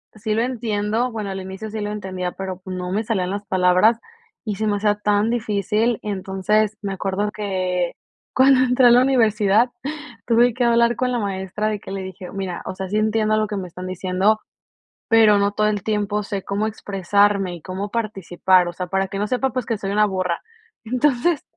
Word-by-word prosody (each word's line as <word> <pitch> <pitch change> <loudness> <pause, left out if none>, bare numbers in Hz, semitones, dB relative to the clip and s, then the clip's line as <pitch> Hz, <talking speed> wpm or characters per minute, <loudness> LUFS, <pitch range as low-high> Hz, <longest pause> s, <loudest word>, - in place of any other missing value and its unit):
sí 215 0 -2
lo 220 - +1
entiendo, 230 -1 -1
bueno, 210 -3 -4
al 190 0 -4
inicio 190 +3 -7
sí 220 +1 -5
lo 205 - -3
entendía, 185 -3 -4
pero, 190 -1 -6
pues, 185 0 -6
no 180 0 -4
me 210 +4 0
salían 190 -5 -1
las 205 +1 -4
palabras 185 +5 +3 0.5
y 210 -3 -2
se 215 - -2
me 205 - +1
hacía 205 0 +2
tan 210 +1 +1
difícil. 215 0 0
Entonces, 205 +2 0
me 195 -1 -3
acuerdo 195 +2 -1
que 185 -4 -2 0.4
cuando 260 0 +5
entré 250 0 +4
a - - +7
la 245 +1 +7
universidad 225 -3 +3 0.6
tuve 240 +1 +4
que 250 - -1
hablar 235 0 +3
con 250 -1 0
la 245 - 0
maestra 195 0 -2
de 210 -2 -2
que - - -10
le 195 0 -4
dije: 190 -1 -8
"Mira, 190 -2 -4
o - - -4
sea, 190 0 -6
sí 210 - 0
entiendo 215 0 +2
lo 215 - +1
que 205 - -4
me 185 -2 -4
están 180 +2 -9
diciendo, 185 +4 +1 0.7
pero 220 -2 +6
no 200 0 +1
todo 210 +1 +1
el 205 -3 -1
tiempo 210 -1 -1
sé 200 -2 -4
cómo 205 +2 -1
expresarme 200 -2 +1
y 165 - -12
cómo 195 +2 -4
participar," 190 -4 +1
o 175 - -4
sea, 180 - -4
para 190 +1 0
que 195 0 -6
no 210 - 0
sepa, 255 +3 0
pues, 255 -2 -3
que 225 - -1
soy 195 -1 -4
una 210 +1 +4
burra. 185 -3 -2 0.4
Entonces, 260 +5 +1
205 Hz, 205 wpm, -21 LUFS, 190-220 Hz, 0.7 s, a